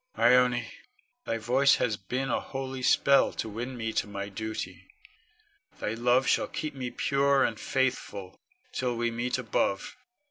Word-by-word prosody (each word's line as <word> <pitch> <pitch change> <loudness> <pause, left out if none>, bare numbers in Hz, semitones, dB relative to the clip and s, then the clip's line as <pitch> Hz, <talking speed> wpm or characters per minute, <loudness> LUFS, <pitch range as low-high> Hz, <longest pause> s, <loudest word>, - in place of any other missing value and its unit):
Ione, 125 -1 +4 0.6
thy 115 - -1
voice 130 +5 +4
hath 105 -5 -2
been 135 +2 -1
a - - +1
holy 135 -1 -5
spell 140 +2 +4
to - - -3
win 120 +4 -5
me 115 -1 -3
to - - 0
my 100 0 -5
duty. 110 +2 -6 0.9
Thy 105 - -2
love 120 +3 +3
shall - - +2
keep 155 - -4
me 130 -2 -4
pure 140 +2 +2
and 110 - -1
faithful, 105 -7 -2 0.3
till 125 -2 -1
we 120 0 0
meet 120 +2 -1
above. 105 -5 -1
125 Hz, 150 wpm, -28 LUFS, 110-130 Hz, 0.9 s, Ione